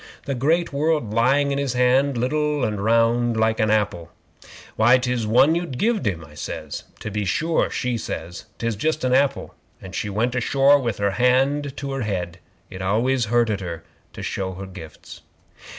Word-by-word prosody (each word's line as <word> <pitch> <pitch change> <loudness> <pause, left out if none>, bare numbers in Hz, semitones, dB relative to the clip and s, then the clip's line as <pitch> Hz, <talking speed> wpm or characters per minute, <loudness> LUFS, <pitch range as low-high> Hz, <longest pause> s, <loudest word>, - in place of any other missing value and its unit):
The 140 - -2
great 155 +6 +1
world 150 -6 0
lying 140 +5 +3
in 140 - -1
his 140 -3 -1
hand, 125 +2 +2
liddle 150 +2 0
and 105 -3 -3
round 115 +1 +2
like 110 0 +1
a 110 -1 +2
apple." 105 -6 -1 0.6
'"Why, 120 +4 +5
'tis 125 -3 -1
one 125 +8 +5
you 170 +1 -1
gived 200 - 0
him," 85 -5 -2
I 75 - -16
says. 75 - -6 0.2
'"To 105 - -5
be 105 0 -2
sure," 160 - 0
she 125 -3 -2
says. 85 -1 -6
"'Tis 115 -1 -2
just 155 +8 -1
a 130 0 +2
apple," 140 0 +1 0.3
and 95 -1 -11
she 105 - -3
went 115 +5 0
ashore 135 +3 +4
with 120 -5 -2
her 100 0 0
hand 135 +5 +1
to 140 -1 -4
her 135 -1 -3
head. 90 -6 -3 0.3
It 95 - -7
always 115 +6 +1
hurted 110 -2 +1
her 85 -3 -6 0.3
to - - -8
show 95 -1 -3
her 95 +2 -7
gifts. 90 -6 -11
120 Hz, 180 wpm, -22 LUFS, 105-140 Hz, 0.6 s, Why